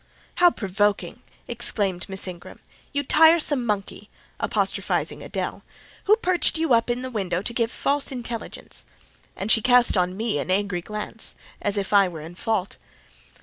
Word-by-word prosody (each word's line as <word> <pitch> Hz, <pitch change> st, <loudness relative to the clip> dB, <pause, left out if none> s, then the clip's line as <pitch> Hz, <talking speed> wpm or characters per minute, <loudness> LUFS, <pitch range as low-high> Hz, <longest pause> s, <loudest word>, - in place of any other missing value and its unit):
"How 355 Hz, 0 st, +7 dB
provoking!" 205 Hz, -, -1 dB, 0.3 s
exclaimed 200 Hz, -6 st, -1 dB
Miss 190 Hz, 0 st, -3 dB
Ingram: 180 Hz, -1 st, -9 dB, 0.3 s
"you 285 Hz, 0 st, -1 dB
tiresome 310 Hz, -2 st, +5 dB
monkey!" 210 Hz, -1 st, -3 dB, 0.3 s
(apostrophising -, -, -1 dB
Adèle), -, -, -4 dB, 0.4 s
"who 425 Hz, +1 st, +6 dB
perched 360 Hz, -6 st, +2 dB
you 320 Hz, -5 st, +2 dB
up 230 Hz, +1 st, +3 dB
in 240 Hz, +1 st, -1 dB
the 260 Hz, -, -5 dB
window 185 Hz, -5 st, -2 dB
to 235 Hz, -, -2 dB
give 230 Hz, -1 st, 0 dB
false 280 Hz, 0 st, -1 dB
intelligence?" 240 Hz, -3 st, -5 dB, 0.5 s
and 200 Hz, +3 st, -2 dB
she 225 Hz, -, +5 dB
cast 245 Hz, 0 st, +5 dB
on 180 Hz, 0 st, 0 dB
me 220 Hz, -8 st, -1 dB
an 140 Hz, -, -4 dB
angry 195 Hz, -1 st, 0 dB
glance, 210 Hz, +3 st, -3 dB, 0.3 s
as 205 Hz, 0 st, 0 dB
if 200 Hz, 0 st, -2 dB
I 200 Hz, -1 st, +6 dB
were 165 Hz, -3 st, -7 dB
in 160 Hz, +3 st, -9 dB
fault. 195 Hz, +1 st, -2 dB
215 Hz, 155 wpm, -24 LUFS, 190-250 Hz, 0.5 s, How